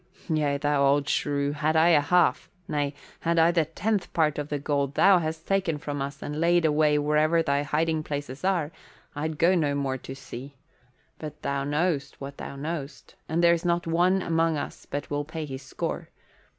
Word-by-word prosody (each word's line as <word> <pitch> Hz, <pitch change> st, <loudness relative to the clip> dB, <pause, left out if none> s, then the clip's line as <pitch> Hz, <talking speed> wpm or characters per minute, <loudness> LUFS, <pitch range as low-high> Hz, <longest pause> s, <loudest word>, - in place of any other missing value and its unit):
"Yea, 150 Hz, -3 st, +1 dB
thou 145 Hz, -1 st, +1 dB
old 140 Hz, +1 st, +3 dB
shrew, 145 Hz, -1 st, 0 dB
had 155 Hz, +2 st, 0 dB
I 160 Hz, +2 st, +5 dB
a 155 Hz, -4 st, +5 dB
half 175 Hz, +4 st, +2 dB, 0.2 s
nay, 145 Hz, -1 st, -1 dB, 0.2 s
had 170 Hz, 0 st, 0 dB
I 165 Hz, +1 st, +5 dB
the 165 Hz, -2 st, +2 dB
tenth 190 Hz, +5 st, -2 dB
part 150 Hz, -3 st, +1 dB
of 145 Hz, 0 st, -4 dB
the 145 Hz, -, -1 dB
gold 140 Hz, -1 st, -1 dB
thou 195 Hz, -2 st, +6 dB
hast 160 Hz, 0 st, -4 dB
taken 190 Hz, -5 st, +1 dB
from 145 Hz, -1 st, -4 dB
us 140 Hz, 0 st, -5 dB
and 150 Hz, +2 st, -4 dB
laid 170 Hz, 0 st, +3 dB
away 150 Hz, -1 st, +3 dB
wherever 155 Hz, +3 st, +2 dB
thy 140 Hz, -2 st, +1 dB
hiding 155 Hz, +2 st, 0 dB
places 145 Hz, -2 st, -5 dB
are, 175 Hz, -5 st, +1 dB, 0.4 s
I'd 155 Hz, +1 st, -3 dB
go 170 Hz, +4 st, +4 dB
no 150 Hz, -5 st, +1 dB
more 135 Hz, -2 st, -1 dB
to 135 Hz, -, -8 dB
sea. 135 Hz, +1 st, -9 dB, 0.6 s
But 150 Hz, -1 st, -8 dB
thou 140 Hz, 0 st, -1 dB
know'st 150 Hz, -1 st, -1 dB
what 140 Hz, 0 st, -8 dB
thou -, -, -7 dB
know'st, 150 Hz, 0 st, -6 dB, 0.2 s
and 165 Hz, +2 st, +1 dB
there's 170 Hz, -1 st, +4 dB
not 175 Hz, -1 st, +1 dB
one 180 Hz, +3 st, +2 dB
among 165 Hz, -1 st, +1 dB
us 145 Hz, -, -6 dB
but 145 Hz, +1 st, -5 dB
will 145 Hz, 0 st, -1 dB
pay 155 Hz, +1 st, -5 dB
his 135 Hz, -2 st, -7 dB
score. 130 Hz, -, -5 dB
150 Hz, 190 wpm, -26 LUFS, 145-165 Hz, 0.6 s, thou